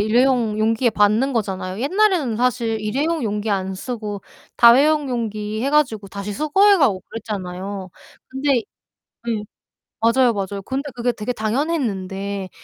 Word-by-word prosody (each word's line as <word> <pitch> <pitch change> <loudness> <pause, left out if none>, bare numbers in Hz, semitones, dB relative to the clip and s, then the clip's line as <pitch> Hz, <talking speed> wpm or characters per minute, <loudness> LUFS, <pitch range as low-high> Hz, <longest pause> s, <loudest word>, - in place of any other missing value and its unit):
일회용 230 0 +2
용기에 225 +3 +2
받는 215 +6 +2
거잖아요. 195 -3 -3
옛날에는 340 - +2
사실 235 -2 0
일회용 285 +10 -1
용기 210 -1 -2
안 190 -2 -1
쓰고 210 -2 -5 0.3
다회용 280 +5 +5
용기 215 -3 -3
해 275 - 0
가지고 235 -9 +1
다시 200 +1 -5
수거해 385 - +4
가고 210 -11 +2
그랬잖아요. 195 -3 -5 0.4
근데 265 -1 0 0.7
예. 215 -2 -1 0.6
맞아요, 235 +2 +4
맞아요. 200 -1 -4
근데 275 +2 -3
그게 245 0 -1
되게 215 +2 -4
당연했는데 205 - -2
225 Hz, 320 characters per minute, -21 LUFS, 205-265 Hz, 0.7 s, 다회용